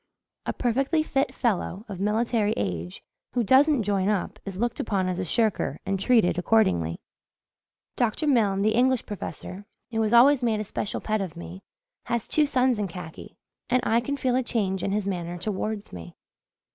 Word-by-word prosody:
A -, -, 0 dB
perfectly 270 Hz, +6 st, +1 dB
fit 275 Hz, -3 st, -1 dB
fellow, 210 Hz, -3 st, -1 dB
of 195 Hz, -4 st, -7 dB
military 215 Hz, +1 st, +1 dB
age, 90 Hz, -3 st, -4 dB, 0.3 s
who 245 Hz, -, +1 dB
doesn't 265 Hz, +3 st, +4 dB
join 200 Hz, -1 st, +1 dB
up 210 Hz, 0 st, -2 dB
is 195 Hz, -2 st, -6 dB
looked 240 Hz, +3 st, -1 dB
upon 195 Hz, -4 st, 0 dB
as 185 Hz, 0 st, -2 dB
a -, -, -1 dB
shirker 215 Hz, +4 st, 0 dB
and 195 Hz, 0 st, -1 dB
treated 195 Hz, -5 st, +3 dB
accordingly. 170 Hz, -, +2 dB, 1.0 s
Dr. 240 Hz, +5 st, 0 dB
Milne, 210 Hz, -8 st, +2 dB
the 215 Hz, +1 st, +3 dB
English 255 Hz, +1 st, +2 dB
professor, 205 Hz, -1 st, -7 dB, 0.2 s
who 225 Hz, -1 st, 0 dB
has 215 Hz, -1 st, +1 dB
always 260 Hz, +3 st, +6 dB
made 225 Hz, -3 st, +1 dB
a -, -, -1 dB
special 205 Hz, 0 st, -4 dB
pet 215 Hz, -1 st, -1 dB
of 175 Hz, -3 st, -5 dB
me, 175 Hz, +2 st, -9 dB, 0.4 s
has 235 Hz, -2 st, -2 dB
two 300 Hz, -1 st, +2 dB
sons 255 Hz, -4 st, +2 dB
in 205 Hz, -, -1 dB
khaki; 170 Hz, -3 st, -10 dB, 0.3 s
and 255 Hz, -, +3 dB
I 230 Hz, +1 st, +3 dB
can 280 Hz, +4 st, -3 dB
feel 255 Hz, -2 st, 0 dB
the 255 Hz, -, +2 dB
change 200 Hz, -7 st, -1 dB
in 195 Hz, -, -1 dB
his 205 Hz, 0 st, -1 dB
manner 175 Hz, -3 st, -3 dB
towards 210 Hz, +2 st, -4 dB
me." 85 Hz, -1 st, -9 dB
215 Hz, 180 wpm, -26 LUFS, 190-240 Hz, 1.0 s, always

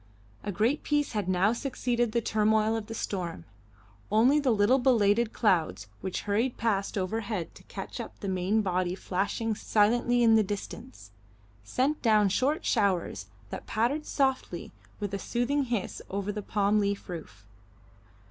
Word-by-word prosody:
A 205 Hz, -, -3 dB
great 225 Hz, -, +1 dB
peace 295 Hz, -1 st, 0 dB
had 205 Hz, -4 st, -2 dB
now 185 Hz, +4 st, +3 dB
succeeded 240 Hz, -2 st, -1 dB
the 235 Hz, +1 st, +1 dB
turmoil 215 Hz, 0 st, +2 dB
of 220 Hz, -2 st, -4 dB
the 225 Hz, -, -6 dB
storm. 175 Hz, -, -4 dB, 0.7 s
Only 245 Hz, +8 st, +5 dB
the 280 Hz, -3 st, +1 dB
little 225 Hz, +4 st, +4 dB
belated 230 Hz, -3 st, +3 dB
clouds, 160 Hz, -, +1 dB
which 190 Hz, 0 st, -3 dB
hurried 225 Hz, +5 st, 0 dB
past 205 Hz, -3 st, 0 dB
overhead 200 Hz, -1 st, -2 dB
to -, -, -15 dB
catch -, -, -7 dB
up -, -, -7 dB
the 200 Hz, -, -5 dB
main 190 Hz, +3 st, +1 dB
body 185 Hz, -1 st, 0 dB
flashing 200 Hz, +4 st, -1 dB
silently 240 Hz, +3 st, +2 dB
in 225 Hz, -1 st, +6 dB
the 220 Hz, -, +6 dB
distance, 130 Hz, -, -7 dB, 0.5 s
sent 265 Hz, -, 0 dB
down 215 Hz, -3 st, +4 dB
short 270 Hz, -, 0 dB
showers 185 Hz, -, 0 dB, 0.2 s
that -, -, -6 dB
pattered 260 Hz, +8 st, 0 dB
softly 265 Hz, -2 st, -1 dB, 0.3 s
with 205 Hz, -2 st, -4 dB
a 200 Hz, -, -2 dB
soothing 265 Hz, +6 st, 0 dB
hiss 235 Hz, -6 st, -3 dB
over 200 Hz, +1 st, -2 dB
the 210 Hz, 0 st, -4 dB
palm 205 Hz, +1 st, +1 dB
leaf 200 Hz, -1 st, -1 dB
roof. 160 Hz, -, -8 dB
215 Hz, 155 wpm, -28 LUFS, 195-240 Hz, 0.7 s, in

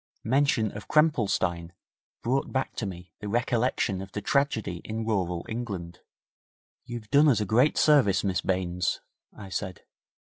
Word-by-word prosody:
Mention 125 Hz, -3 st, +2 dB
of 105 Hz, -, -8 dB
Krempelstein 95 Hz, -, +1 dB, 0.5 s
brought 130 Hz, +4 st, 0 dB
back 130 Hz, 0 st, -2 dB
to 110 Hz, -, -2 dB
me 90 Hz, -2 st, -9 dB
the 105 Hz, -, -6 dB
recollection 120 Hz, -4 st, 0 dB
of 95 Hz, -, -9 dB
the -, -, -2 dB
tragedy 110 Hz, -, 0 dB
in 110 Hz, +1 st, -4 dB
rural 90 Hz, -6 st, -1 dB
England. 100 Hz, -7 st, -5 dB, 0.9 s
'You've 120 Hz, -3 st, -8 dB
done 145 Hz, +2 st, +6 dB
us 120 Hz, -6 st, +3 dB
a 105 Hz, -, 0 dB
great 120 Hz, +9 st, +3 dB
service, 140 Hz, -11 st, +4 dB
Miss 95 Hz, -3 st, 0 dB
Baines,' 90 Hz, -1 st, -1 dB, 0.3 s
I 100 Hz, -2 st, -11 dB
said. 95 Hz, -1 st, -4 dB
110 Hz, 145 wpm, -27 LUFS, 95-125 Hz, 0.9 s, done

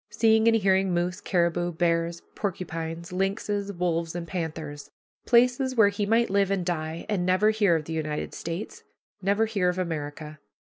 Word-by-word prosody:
Seeing 220 Hz, 0 st, +3 dB
and 225 Hz, 0 st, +5 dB
hearing 190 Hz, -2 st, +2 dB
moose, 175 Hz, +2 st, -1 dB
caribou, 175 Hz, -2 st, 0 dB
bears, 170 Hz, 0 st, 0 dB
porcupines, 170 Hz, -3 st, -4 dB
lynxes, 200 Hz, +2 st, -1 dB
wolves, 170 Hz, -2 st, -1 dB
and 170 Hz, -1 st, -4 dB
panthers. 155 Hz, -4 st, -5 dB, 0.4 s
Places 250 Hz, +2 st, +3 dB
where 215 Hz, -4 st, +6 dB
he 200 Hz, 0 st, -2 dB
might 230 Hz, 0 st, +2 dB
live 200 Hz, -1 st, +2 dB
and 195 Hz, -3 st, -1 dB
die 160 Hz, -2 st, -3 dB
and 205 Hz, -4 st, 0 dB
never 185 Hz, +4 st, +3 dB
hear 205 Hz, -5 st, +3 dB
of 155 Hz, -2 st, -2 dB
the 165 Hz, -, -5 dB
United 155 Hz, -1 st, -3 dB
States 170 Hz, +5 st, -6 dB, 0.4 s
never 200 Hz, +3 st, +2 dB
hear 200 Hz, -5 st, +1 dB
of 180 Hz, -, -2 dB
America. 155 Hz, -3 st, -4 dB
180 Hz, 160 wpm, -26 LUFS, 165-205 Hz, 0.4 s, where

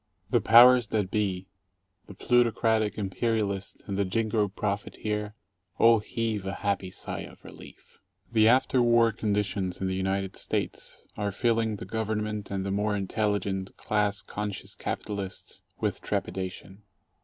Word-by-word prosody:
The 120 Hz, -3 st, +3 dB
powers 120 Hz, +2 st, +7 dB
that 105 Hz, -3 st, -1 dB
be 95 Hz, -3 st, -1 dB, 0.3 s
— 95 Hz, +2 st, -46 dB
the 100 Hz, -, -11 dB
plutocratic 110 Hz, -2 st, +2 dB
imperialist 100 Hz, -1 st, -2 dB
and 100 Hz, -1 st, -3 dB
the -, -, +3 dB
jingo 105 Hz, +2 st, 0 dB
profiteer 105 Hz, +1 st, -3 dB, 0.2 s
— 90 Hz, 0 st, -46 dB
all 115 Hz, -1 st, +6 dB
heave 110 Hz, -1 st, -2 dB
a 95 Hz, 0 st, -3 dB
happy 100 Hz, -2 st, 0 dB
sigh -, -, -5 dB
of -, -, -10 dB
relief. -, -, -14 dB, 0.3 s
Ill -, -, -25 dB
The 110 Hz, -1 st, +5 dB
after 130 Hz, +1 st, +4 dB
war 115 Hz, -1 st, +4 dB
conditions 100 Hz, -3 st, -1 dB
in 95 Hz, -, -2 dB
the 95 Hz, 0 st, -1 dB
United 95 Hz, 0 st, -1 dB
States -, -, -4 dB
are 105 Hz, -1 st, -1 dB
filling 115 Hz, 0 st, +1 dB
the 95 Hz, -, -7 dB
Government 105 Hz, 0 st, -3 dB
and 95 Hz, -1 st, -3 dB
the 100 Hz, -, -2 dB
more 105 Hz, +1 st, 0 dB
intelligent, 100 Hz, -1 st, -2 dB
class 105 Hz, -1 st, 0 dB
conscious 105 Hz, -2 st, -5 dB
capitalists 100 Hz, -3 st, -5 dB, 0.2 s
with -, -, -1 dB
trepidation. 95 Hz, +1 st, -4 dB
105 Hz, 145 wpm, -28 LUFS, 95-110 Hz, 0.3 s, powers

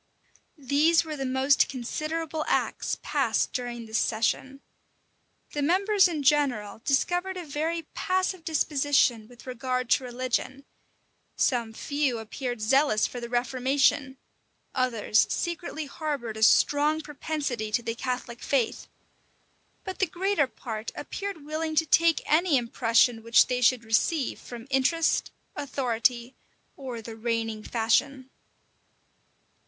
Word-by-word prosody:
These 295 Hz, +5 st, +3 dB
were 310 Hz, -1 st, -5 dB
the 270 Hz, -2 st, -3 dB
most 265 Hz, +2 st, +3 dB
considerable 310 Hz, +5 st, -3 dB
acts -, -, 0 dB
passed -, -, 0 dB
during 240 Hz, -2 st, -4 dB
this 220 Hz, 0 st, -1 dB
session. 265 Hz, +5 st, -1 dB, 0.9 s
The 295 Hz, -, -3 dB
members 385 Hz, +6 st, +4 dB
in 315 Hz, -5 st, -3 dB
general 255 Hz, -8 st, +1 dB
discovered 355 Hz, +7 st, 0 dB
a 355 Hz, -, -6 dB
very 320 Hz, +3 st, -2 dB
passive 370 Hz, -1 st, -1 dB
disposition 285 Hz, -7 st, +1 dB
with 245 Hz, 0 st, -16 dB
regard 255 Hz, 0 st, -3 dB
to -, -, +4 dB
religion: 255 Hz, +2 st, -3 dB, 0.7 s
some 235 Hz, -4 st, +1 dB
few 285 Hz, +1 st, -1 dB
appeared 240 Hz, +2 st, -5 dB
zealous 245 Hz, -1 st, +3 dB
for 245 Hz, -, -5 dB
the 235 Hz, 0 st, -6 dB
reformation: 260 Hz, +2 st, +1 dB, 0.6 s
others 235 Hz, -4 st, +2 dB
secretly 340 Hz, -2 st, -3 dB
harbored 280 Hz, -6 st, -4 dB
a -, -, -6 dB
strong 295 Hz, +7 st, +4 dB
propensity 285 Hz, -7 st, -4 dB
to 235 Hz, +2 st, 0 dB
the 230 Hz, -, -2 dB
Catholic 245 Hz, 0 st, -4 dB
faith: 265 Hz, -5 st, -1 dB, 1.0 s
but 375 Hz, -1 st, -6 dB
the 385 Hz, -, +2 dB
greater 355 Hz, -3 st, 0 dB
part 220 Hz, -3 st, -6 dB
appeared 395 Hz, -7 st, -6 dB
willing 315 Hz, +1 st, -3 dB
to 320 Hz, -, +3 dB
take 330 Hz, +1 st, +3 dB
any 320 Hz, -1 st, +3 dB
impression 235 Hz, -1 st, +2 dB
which 230 Hz, +1 st, +5 dB
they 250 Hz, 0 st, -2 dB
should 250 Hz, -1 st, +3 dB
receive 245 Hz, +6 st, 0 dB
from 240 Hz, -1 st, -9 dB
interest 315 Hz, +5 st, +2 dB, 0.3 s
authority, 245 Hz, -2 st, -1 dB, 0.4 s
or 250 Hz, -5 st, -7 dB
the 225 Hz, 0 st, -8 dB
reigning 225 Hz, -1 st, -2 dB
fashion. 260 Hz, +4 st, 0 dB
265 Hz, 125 wpm, -27 LUFS, 235-310 Hz, 1.0 s, which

